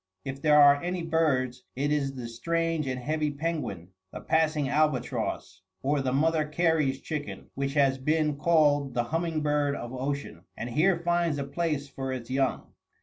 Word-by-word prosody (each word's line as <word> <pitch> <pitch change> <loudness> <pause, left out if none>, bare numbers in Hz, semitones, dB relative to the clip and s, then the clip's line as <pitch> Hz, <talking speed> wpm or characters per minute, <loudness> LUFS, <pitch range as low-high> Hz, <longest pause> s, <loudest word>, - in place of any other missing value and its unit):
If 135 +1 -5
there 150 -1 +5
are 145 0 +7
any 180 0 -3
birds, 135 -7 0
it 145 +3 0
is 140 -2 0
the 125 -2 -5
strange 165 +5 -1
and 130 -1 -2
heavy 150 +3 -1
penguin, 145 - -4 0.2
the - - -7
passing 155 -3 +1
albatross, 140 -3 -1 0.2
or 140 +1 +1
the 130 -1 -1
Mother 155 +3 +2
Cary's 150 -3 +1
chicken, 150 -2 -6
which 140 +1 -3
has 135 -2 +3
been 150 +2 +1
called 145 -3 +2
the 120 - +2
humming 165 +4 -1
bird 145 -1 +1
of 120 -2 -6
ocean, 140 +2 -4
and 120 +2 -5
here 170 +8 +3
finds 170 -2 0
a 140 - -2
place 150 0 -2
for 135 -1 -5
its 130 -1 -6
young. 135 0 -1
145 Hz, 170 wpm, -28 LUFS, 135-160 Hz, 0.2 s, are